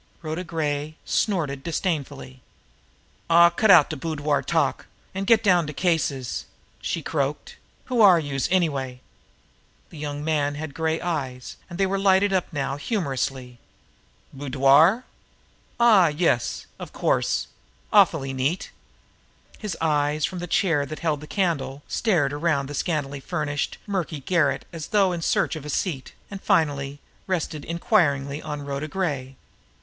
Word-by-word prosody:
Rhoda 160 +3 -3
Gray 155 -3 -3
snorted 155 -10 0
disdainfully. 145 -7 -3 0.9
"Aw, 170 +1 +7
cut 215 +5 +1
out 150 - +7
de - - -3
boudoir 150 -1 -1
talk, - - 0 0.3
an' 195 +1 -3
get 225 +1 +4
down 180 -6 +3
to 150 - -5
cases!" 145 -7 -1 0.4
she - - -3
croaked. - - -3 0.3
"Who 250 -3 +1
are 190 -5 +7
youse, 140 -4 -2
anyway?" 140 -9 0 0.9
The 160 - -10
young 145 0 -4
man 145 -2 0
had 150 -1 -6
gray 160 +1 -1
eyes 135 -8 -4
and 175 - -7
they 195 - +2
lighted 195 0 +3
up 185 -2 0
now 140 -2 -2
humorously. 135 - -3 0.7
"Boudoir? 145 - +4 0.8
Ah 215 -7 +6
yes! 150 -6 0
Of - - -8
course! - - 0 0.5
Awfully 160 -10 +4
neat!" 135 +7 -1 0.9
His 210 -4 -4
eyes, 150 -1 +1
from 185 - -5
the 175 - -5
chair 165 -5 +2
that 155 +2 -6
held 155 -3 0
the 150 - -9
candle, 145 -7 -1
strayed 165 -11 +1
around 145 -2 0
the 145 - -7
scantily 145 -2 -2
furnished, 145 -1 -3
murky 175 -7 -3
garret 160 -2 +1
as 160 -2 -6
though 200 -3 +3
in 175 -1 -3
search 165 - +1
of 155 - -7
a 150 - -7
seat, 145 -3 -3 0.2
and 195 -1 -7
finally 145 -7 +1 0.3
rested 160 -5 -2
inquiringly 150 -5 +1
on 150 -1 -5
Rhoda 140 +2 -3
Gray. 145 -7 -3
155 Hz, 140 wpm, -24 LUFS, 140-180 Hz, 0.9 s, Aw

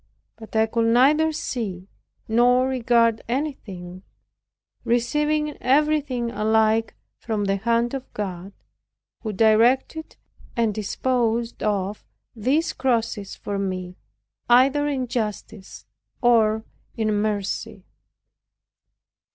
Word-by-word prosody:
But 220 0 -13
I 220 0 +4
could 230 +1 0
neither 300 +6 +4
see 215 - -4 0.4
nor 245 +3 +3
regard 235 -3 +2
anything, 195 -10 -4 0.8
receiving 295 +6 0
everything 275 -3 +1
alike 220 +1 +1 0.2
from 215 -3 -2
the 195 0 +1
hand 235 +3 0
of 265 -1 -6
God, 190 -2 -5 0.7
who 220 - -3
directed 230 +9 +2 0.4
and 225 -2 +1
disposed 230 +2 -1
of 205 -1 -2 0.3
these 270 +9 0
crosses 230 -6 -1
for 200 -1 -4
me 185 -2 -4 0.5
either 270 +4 +4
in 270 -3 -1
justice 215 -3 -5 0.3
or 220 -3 +3 0.3
in 215 -1 0
mercy. 205 -1 -2
230 Hz, 95 wpm, -23 LUFS, 210-255 Hz, 0.8 s, I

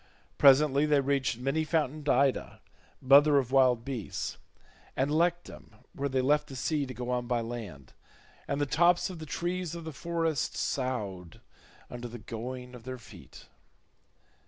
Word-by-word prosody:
Presently 140 +1 +5
they 150 -1 +4
reached 135 -3 0
many 135 +6 -1
fountained 155 -2 -1
Ida, 135 +1 +1 0.4
mother 140 +2 +6
of 130 -2 0
wild 125 -3 +3
beasts, 130 -6 -5 0.6
and 135 +2 +1
Lectum 175 +2 -1 0.2
where 140 0 -2
they 130 -1 +1
left 150 +2 +2
the 135 - -9
sea 145 +2 -1
to 130 - -7
go 125 0 -4
on 125 -1 -1
by 120 -1 0
land, 110 - -8 0.5
and 140 - -2
the 145 - +1
tops 175 +6 +3
of 175 - -9
the 155 - -8
trees 175 +2 -3
of 170 - -7
the 160 -1 -7
forest 165 -2 -2
soughed 105 - -3 0.5
under 120 0 -7
the 120 +1 -8
going 125 +3 -7
of 125 -2 -11
their 130 +1 -6
feet. 120 - -14
135 Hz, 160 wpm, -29 LUFS, 125-150 Hz, 0.6 s, mother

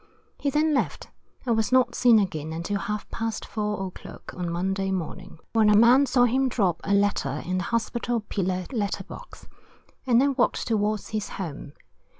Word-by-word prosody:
He 285 - 0
then 305 +2 +2
left, 275 - -2 0.3
and 235 -2 +2
was 220 -2 0
not 255 -1 +4
seen 240 -2 +5
again 160 -6 -1
until 170 +5 -2
half 210 +1 -4
past 225 -1 -3
4. 210 -2 -3
o'clock 185 - -10
on 180 -1 -3
Monday 190 +3 -1
morning, 180 -3 -5 0.2
when 220 -2 +4
a 210 - +6
man 250 +5 +6
saw 250 0 +3
him 260 +2 +2
drop 190 -8 0
a 200 - -3
letter 195 -8 0
in 185 +1 -1
the 175 - -3
Hospital 235 +1 -1
pillar 185 -3 -2
letter 210 -6 -2
box, - - -12 0.6
and 240 -2 +5
then 280 +1 +3
walked 255 -2 +1
towards 215 -2 0
his 215 -2 -3
home. 150 -6 -6
210 Hz, 175 wpm, -25 LUFS, 185-240 Hz, 0.6 s, a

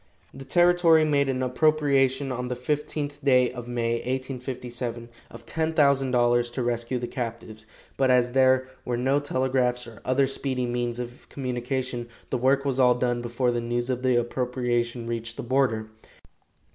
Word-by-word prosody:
The 135 0 -10
territory 175 +1 +4
made 140 -2 +2
an 130 -1 -1
appropriation 135 -1 +2
on 125 0 -3
the 125 - -3
fifteenth 145 +2 -3
day 125 -3 +4
of 120 -1 -8
May, 115 -1 -1
1857, 125 -2 -5 0.2
of 115 0 -12
$10,000 135 -7 +2
to 125 - -2
rescue 120 +1 -1
the 120 - -3
captives, 115 -2 -6 0.3
but 135 -1 +2
as 125 -1 +3
there 130 0 +3 0.2
were 120 -1 -2
no 135 +3 +2
telegraphs 130 -3 0
or 115 -3 -13
other 130 +2 +2
speedy 130 -1 -2
means 120 -1 -2
of 120 0 -8
communication, 125 -1 -3 0.2
the 130 - 0
work 135 +2 +2
was 135 -1 0
all 125 -1 +5
done 120 -1 0
before 120 +1 0
the 120 0 -1
news 120 +2 -2
of 125 -1 -2
the 130 -1 +2
appropriation 120 -1 -1
reached 115 0 -4
the - - -4
border. 120 -4 0
125 Hz, 160 wpm, -26 LUFS, 120-135 Hz, 0.3 s, all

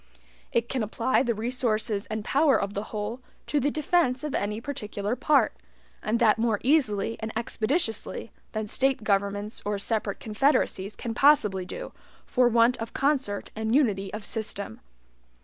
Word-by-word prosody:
It 235 0 +1
can 260 -1 -2
apply 230 +4 +1
the 240 -3 0
resources 220 -3 0
and 215 -1 -4
power 285 0 +4
of 200 0 -3
the 205 +1 -3
whole 215 +4 -4 0.2
to 295 - +1
the 285 +2 +1
defense 305 -4 +1
of 300 - -3
any 210 +2 -1
particular 215 -4 -3
part, 295 +1 +3 0.5
and 215 +2 0
that 225 -2 +4
more 225 -3 +1
easily 230 -7 +2
and 220 0 -4
expeditiously 230 - -1 0.2
than 215 -1 -2
State 265 +2 +1
governments 205 +1 -1
or 205 0 -1
separate 210 0 -1
confederacies 215 -3 +1
can 235 - -4
possibly 210 -9 +4
do, - - -6 0.3
for 250 -1 +3
want 235 +1 +4
of 225 0 -6
concert 270 -8 0
and 220 +2 0
unity 200 -9 +2
of 210 0 -6
system. 205 - -4
225 Hz, 155 wpm, -27 LUFS, 210-260 Hz, 0.5 s, power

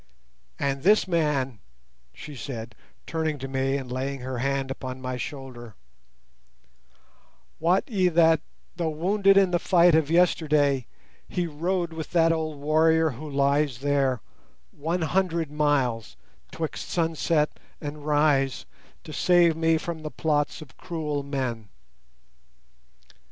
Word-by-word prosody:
And 140 -1 -1
this 205 +4 +4
man," 150 - 0 0.5
she 150 -2 -10
said, 115 -2 -6 0.3
turning 160 -2 -2
to 135 0 -6
me 135 +1 0
and 130 -3 -7
laying 135 +1 -3
her 130 -1 -4
hand 135 +1 -1
upon 130 -1 -6
my 130 0 -4
shoulder, 125 -4 -7 1.8
"wot 175 +4 +2
ye 195 -7 +2
that, 165 -2 +4 0.3
though 170 -2 -1
wounded 195 +5 +3
in 195 -2 +4
the 175 - +2
fight 175 -2 +4
of 155 -2 +3
yesterday, 150 -6 +2 0.4
he 180 - -1
rode 170 +2 -2
with 160 -1 -6
that 165 -1 +4
old 160 -2 -2
warrior 160 +2 +3
who 145 +5 -8
lies 140 -1 +1
there, 135 -4 +1 0.5
one 165 +4 -2
hundred 170 -3 0
miles 140 -7 0 0.3
"twixt 160 -2 -5
sun 165 -2 0
set 155 -1 0 0.2
and 145 0 -7
rise 145 -3 +2 0.4
to 160 -3 -9
save 175 0 +4
me 160 0 +2
from 165 0 -5
the 155 - -5
plots 150 0 -1
of 140 - -19
cruel 150 -4 -3
men. 130 -7 -4
150 Hz, 130 wpm, -26 LUFS, 135-165 Hz, 1.8 s, this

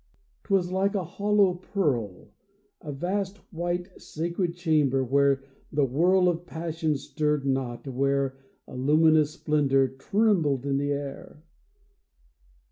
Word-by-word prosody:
'Twas 185 -3 +1
like 195 +2 +1
a 195 - 0
hollow 200 +2 +2
pearl 145 - -2 0.3
— 205 - -43
A 150 - -6
vast 190 +7 -2 0.2
white 175 +2 -4
sacred 170 +2 -3
chamber, 150 -6 +2
where 135 +1 +2 0.3
the 145 -1 +2
whirl 180 +8 +3
Of 175 0 -1
passion 160 -1 -2
stirred 150 0 -1
not, 130 -1 -2
where 135 +1 0 0.3
A - - -10
luminous 155 +3 +4
splendor 135 -3 +2
trembled 150 - +1
in 140 -1 0
the 145 0 -1
air. 140 +1 -6
155 Hz, 125 wpm, -26 LUFS, 135-180 Hz, 0.3 s, luminous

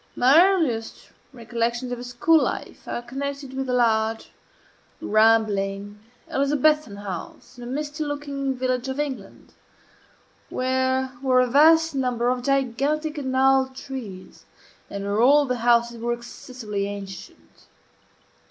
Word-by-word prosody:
My 275 +7 +6
earliest 310 -13 -1 0.2
recollections 235 0 -3
of 245 - -4
a - - -7
school 250 +6 +3
life - - -6
are 240 - -4
connected 275 +2 -5
with 265 -1 -4
a - - 0
large, 225 -2 +1 0.7
rambling, 205 -2 +1 0.3
Elizabethan 290 -3 +1
house, 200 +3 -8
in - - -8
a - - -7
misty 295 +3 -4
looking 285 -2 -3
village 255 0 -1
of 265 +2 -4
England, 260 -9 -6 1.0
where 260 0 0
were 260 -2 +3
a - - +3
vast 320 +5 +5
number 250 -3 0
of 250 0 -1
gigantic 275 +4 -1
and 260 -2 -3
gnarled 265 0 +3
trees, 235 -9 -9 0.4
and 200 0 -5
where 200 +2 0
all 285 +4 +5
the 250 -2 -2
houses 235 0 +2
were 240 +1 0
excessively 235 -4 -6
ancient. 195 -2 -10
255 Hz, 130 wpm, -24 LUFS, 230-275 Hz, 1.0 s, My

